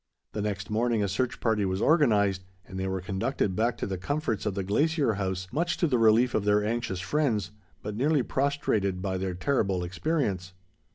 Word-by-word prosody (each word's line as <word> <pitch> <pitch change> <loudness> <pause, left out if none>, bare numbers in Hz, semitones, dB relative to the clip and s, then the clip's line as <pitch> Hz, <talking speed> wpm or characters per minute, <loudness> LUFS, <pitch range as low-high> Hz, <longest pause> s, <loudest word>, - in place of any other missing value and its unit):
The 105 - -3
next 100 -1 -3
morning 115 0 +1
a - - +1
search 120 +6 -1
party 110 -3 +1
was 95 0 -1
organized, 105 - +3 0.2
and 95 0 -7
they 95 - -1
were 95 -1 -2
conducted 100 +1 -1
back 115 +3 +1
to - - -3
the 95 -2 -4
comforts 115 0 -2
of 100 - -1
the 100 - -2
Glacier 145 - +1
House, 95 -2 -3
much 170 +3 0
to - - +2
the 130 -7 +2
relief 115 +2 +4
of 105 - +1
their 105 0 +2
anxious 110 -5 -2
friends, 105 - 0 0.3
but 105 0 -4
nearly 140 +3 +2
prostrated 110 -10 0
by 95 -2 -1
their 95 -1 -2
terrible 95 -3 0
experience. 95 - -2
105 Hz, 190 wpm, -28 LUFS, 95-125 Hz, 0.3 s, relief